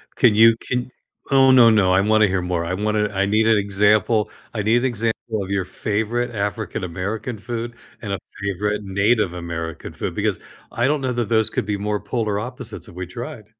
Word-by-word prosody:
Can 115 Hz, -5 st, +4 dB
you 115 Hz, +1 st, +7 dB
can 125 Hz, +1 st, -3 dB, 0.4 s
oh, 135 Hz, -1 st, +6 dB
no, 120 Hz, -3 st, +7 dB
no, 100 Hz, -4 st, +4 dB
I 95 Hz, +1 st, +4 dB
wanna 110 Hz, 0 st, +4 dB
hear 95 Hz, -1 st, 0 dB
more. 90 Hz, -1 st, -1 dB
I 90 Hz, -, -2 dB
wanna 105 Hz, +1 st, 0 dB
I 100 Hz, 0 st, 0 dB
need 110 Hz, +2 st, +2 dB
an 110 Hz, -2 st, +5 dB
example 105 Hz, +2 st, +2 dB, 0.2 s
I 105 Hz, -, -2 dB
need 110 Hz, +3 st, +3 dB
an 125 Hz, -, 0 dB
example 115 Hz, -2 st, -2 dB
of 95 Hz, -, -8 dB
your 100 Hz, -2 st, -1 dB
favorite 110 Hz, +5 st, -2 dB
African 105 Hz, -1 st, -3 dB
American 100 Hz, +7 st, -4 dB
food 120 Hz, +2 st, -5 dB, 0.3 s
and 100 Hz, -3 st, -4 dB
a -, -, -3 dB, 0.2 s
favorite 105 Hz, +2 st, -1 dB
Native 100 Hz, 0 st, +1 dB
American 85 Hz, -2 st, -6 dB
food -, -, -4 dB
because -, -, -1 dB, 0.3 s
I 120 Hz, +2 st, +1 dB
don't 150 Hz, -1 st, +1 dB
know 130 Hz, -1 st, -1 dB
that 120 Hz, -2 st, -2 dB
those 110 Hz, -1 st, +3 dB
could -, -, -2 dB
be 105 Hz, -1 st, -2 dB
more 105 Hz, 0 st, -2 dB
polar 110 Hz, -4 st, -2 dB
opposites 125 Hz, 0 st, -7 dB
if -, -, -14 dB
we 90 Hz, -1 st, -5 dB
tried. 115 Hz, +2 st, -8 dB
105 Hz, 205 wpm, -21 LUFS, 100-115 Hz, 0.4 s, you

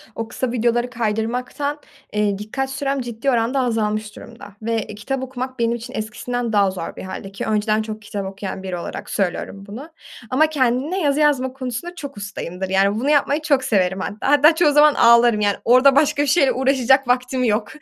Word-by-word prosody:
o 225 Hz, -, -4 dB
kısa 245 Hz, +1 st, -3 dB
videoları 240 Hz, +1 st, 0 dB
kaydırmaktan, 245 Hz, +5 st, -2 dB, 0.3 s
eee, 210 Hz, -1 st, 0 dB
dikkat 240 Hz, +6 st, -4 dB
sürem 275 Hz, 0 st, -2 dB
ciddi 240 Hz, +2 st, -3 dB
oranda 240 Hz, +3 st, +1 dB
azalmış 215 Hz, -3 st, -1 dB
durumda 230 Hz, -4 st, -12 dB
ve, 225 Hz, +1 st, -3 dB
eee, 210 Hz, -, -9 dB
kitap 260 Hz, +6 st, -4 dB
okumak 260 Hz, 0 st, -6 dB
benim 235 Hz, 0 st, +1 dB
için 240 Hz, +2 st, -9 dB
eskisinden 240 Hz, +1 st, -4 dB
daha 200 Hz, -2 st, +3 dB
zor 180 Hz, -3 st, -6 dB
bir -, -, -8 dB
hâlde 190 Hz, +1 st, -7 dB
ki, 195 Hz, -, -5 dB
önceden 215 Hz, 0 st, +1 dB
çok 215 Hz, 0 st, -6 dB
kitap 205 Hz, -1 st, -5 dB
okuyan 190 Hz, 0 st, -6 dB
biri 185 Hz, -2 st, -4 dB
olarak 170 Hz, -, -7 dB
söylüyorum 195 Hz, 0 st, -3 dB
bunu. 250 Hz, +10 st, -9 dB, 0.4 s
Ama 300 Hz, +5 st, +3 dB
kendine 285 Hz, +5 st, 0 dB
yazı 290 Hz, -2 st, +1 dB
yazma 270 Hz, -4 st, +2 dB
konusunda 260 Hz, +6 st, -5 dB
çok 285 Hz, -7 st, -8 dB
ustayımdır. 190 Hz, -2 st, -6 dB
Yani 195 Hz, +1 st, +2 dB
bunu 275 Hz, -, -1 dB
yapmayı 290 Hz, 0 st, +2 dB
çok 280 Hz, -4 st, +1 dB
severim 190 Hz, -6 st, +1 dB
hatta, 210 Hz, +8 st, -2 dB
hatta 295 Hz, +3 st, +6 dB
çoğu 320 Hz, -3 st, +4 dB
zaman 295 Hz, +1 st, +6 dB
ağlarım 235 Hz, -1 st, +5 dB
yani 205 Hz, -1 st, +2 dB
orada 255 Hz, +3 st, +6 dB
başka 290 Hz, 0 st, +3 dB
bir 290 Hz, -, -2 dB
şeyle 275 Hz, -1 st, +4 dB
uğraşacak 265 Hz, 0 st, +2 dB
vaktim 255 Hz, +1 st, 0 dB
yok 215 Hz, -2 st, +1 dB
240 Hz, 190 wpm, -20 LUFS, 210-270 Hz, 0.4 s, hatta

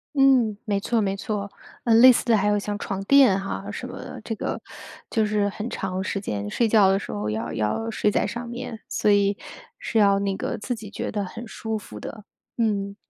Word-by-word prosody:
嗯， 260 Hz, -6 st, +4 dB
没 205 Hz, -3 st, 0 dB
错 230 Hz, +3 st, 0 dB
没 195 Hz, -1 st, 0 dB
错。 200 Hz, -1 st, -4 dB, 0.3 s
呃， 230 Hz, -, +3 dB
类 255 Hz, +3 st, +9 dB
似 245 Hz, -, 0 dB
的 235 Hz, -2 st, +4 dB
还 205 Hz, 0 st, +1 dB
有 205 Hz, 0 st, +3 dB
像 205 Hz, 0 st, -3 dB
床 195 Hz, -3 st, -3 dB
垫 255 Hz, -4 st, +6 dB
哈 195 Hz, 0 st, -5 dB
什 -, -, -6 dB
么 -, -, -8 dB
的。 -, -, -8 dB
这 225 Hz, -, -3 dB
个 -, -, -3 dB, 0.5 s
就 220 Hz, -1 st, +2 dB
是 210 Hz, -1 st, +1 dB
很 215 Hz, +3 st, -5 dB
长 190 Hz, -3 st, -3 dB
时 200 Hz, -, -2 dB
间， 105 Hz, -, -4 dB
睡 230 Hz, -, +1 dB
觉 210 Hz, -3 st, +5 dB
的 195 Hz, -, +3 dB
时 195 Hz, -, -6 dB
候 105 Hz, +1 st, -3 dB
要 110 Hz, +2 st, -3 dB
要 110 Hz, -, -1 dB
睡 210 Hz, -, +1 dB
在 -, -, +1 dB
上 235 Hz, 0 st, -5 dB
面， 240 Hz, -2 st, -6 dB
所 210 Hz, -, +2 dB
以 200 Hz, 0 st, +3 dB, 0.4 s
是 225 Hz, -, 0 dB
要 200 Hz, -1 st, +5 dB
那 200 Hz, -1 st, -1 dB
个 -, -, -3 dB
自 245 Hz, +4 st, -3 dB
己 220 Hz, -3 st, -8 dB
觉 -, -, -4 dB
得 205 Hz, -1 st, -1 dB
很 230 Hz, +5 st, -8 dB
舒 220 Hz, 0 st, -4 dB
服 105 Hz, -, -10 dB
的， 215 Hz, -, -8 dB, 0.3 s
嗯。 200 Hz, -3 st, 0 dB
210 Hz, 240 characters per minute, -24 LUFS, 195-225 Hz, 0.5 s, 类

